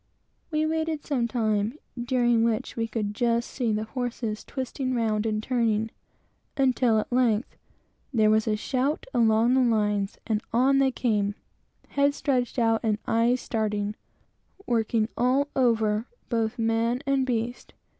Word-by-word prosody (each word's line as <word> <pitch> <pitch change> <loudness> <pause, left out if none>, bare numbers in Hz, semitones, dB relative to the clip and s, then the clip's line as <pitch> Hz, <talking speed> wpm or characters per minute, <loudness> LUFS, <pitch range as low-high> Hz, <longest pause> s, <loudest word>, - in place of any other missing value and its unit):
We 310 -1 0
waited 315 -1 -1
some 250 -5 0
time, 220 0 0 0.3
during 240 -2 +2
which 230 -2 -1
we 225 -1 -1
could 215 -2 -3
just 235 +1 0
see 240 -4 -1
the 215 0 0
horses 230 -2 -4
twisting 260 -1 -3
round 220 -2 0
and 215 -1 -1
turning, 225 -3 0 0.7
until, 255 -4 +3
at 215 - -2
length, 240 -2 +1 0.6
there 215 -4 +3
was 220 +1 +2
a 215 - +2
shout 265 +7 -1
along 230 0 +3
the 265 - +4
lines, 210 -4 +1
and 220 -2 0
on 265 +4 +3
they 270 -1 +4
came 210 -5 0 0.5
heads 280 0 +1
stretched 255 -3 0
out 225 -2 +3
and 215 -2 +1
eyes 235 +2 +2
starting; 210 -2 -1 0.7
working 225 -2 +1
all 260 +4 +2
over, 225 -3 +2 0.2
both 230 0 -1
man 230 +3 0
and 275 -1 +2
beast. 240 0 -3
230 Hz, 145 wpm, -26 LUFS, 220-255 Hz, 0.7 s, the